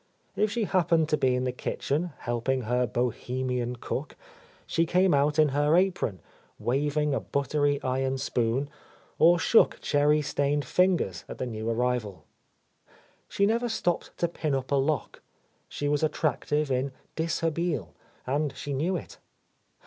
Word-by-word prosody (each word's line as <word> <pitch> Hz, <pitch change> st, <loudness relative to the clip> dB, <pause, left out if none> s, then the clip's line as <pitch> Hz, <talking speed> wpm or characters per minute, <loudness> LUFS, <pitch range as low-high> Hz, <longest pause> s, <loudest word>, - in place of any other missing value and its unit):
If 215 Hz, +1 st, +2 dB
she 230 Hz, +2 st, -1 dB
happened 170 Hz, -5 st, +2 dB
to -, -, +3 dB
be 130 Hz, -2 st, +2 dB
in 125 Hz, -, -1 dB
the 130 Hz, -, 0 dB
kitchen, 150 Hz, +6 st, -2 dB
helping 120 Hz, +2 st, -1 dB
her 125 Hz, +2 st, +1 dB
Bohemian 125 Hz, +1 st, -2 dB
cook, 120 Hz, -, -5 dB, 0.5 s
she 165 Hz, 0 st, +1 dB
came 180 Hz, +1 st, +3 dB
out 145 Hz, +2 st, +2 dB
in 155 Hz, -1 st, +5 dB
her 145 Hz, +4 st, +3 dB
apron, 175 Hz, -, 0 dB, 0.4 s
waving 145 Hz, +3 st, 0 dB
a -, -, +1 dB
buttery 145 Hz, +1 st, 0 dB
iron 130 Hz, +1 st, 0 dB
spoon, 125 Hz, 0 st, 0 dB, 0.5 s
or 170 Hz, +2 st, +6 dB
shook 225 Hz, +6 st, +4 dB
cherry 150 Hz, +1 st, +2 dB
stained 145 Hz, 0 st, 0 dB
fingers 175 Hz, -, +1 dB
at -, -, -7 dB
the -, -, -3 dB
new 110 Hz, -2 st, -4 dB
arrival. 115 Hz, -4 st, -1 dB, 1.1 s
She 200 Hz, -, +2 dB
never 235 Hz, +3 st, +1 dB
stopped 195 Hz, -6 st, -2 dB
to 170 Hz, -, +1 dB
pin 155 Hz, -4 st, -2 dB
up 130 Hz, 0 st, -4 dB
a -, -, +4 dB
lock; 135 Hz, -5 st, -1 dB, 0.5 s
she 145 Hz, -, -3 dB
was 145 Hz, 0 st, +1 dB
attractive 150 Hz, -1 st, 0 dB
in 130 Hz, +1 st, 0 dB, 0.2 s
dishabille, 165 Hz, -, -1 dB, 0.3 s
and 140 Hz, +1 st, -1 dB
she 145 Hz, -, -4 dB
knew 165 Hz, +8 st, 0 dB
it. -, -, -10 dB
145 Hz, 150 wpm, -27 LUFS, 125-160 Hz, 1.1 s, or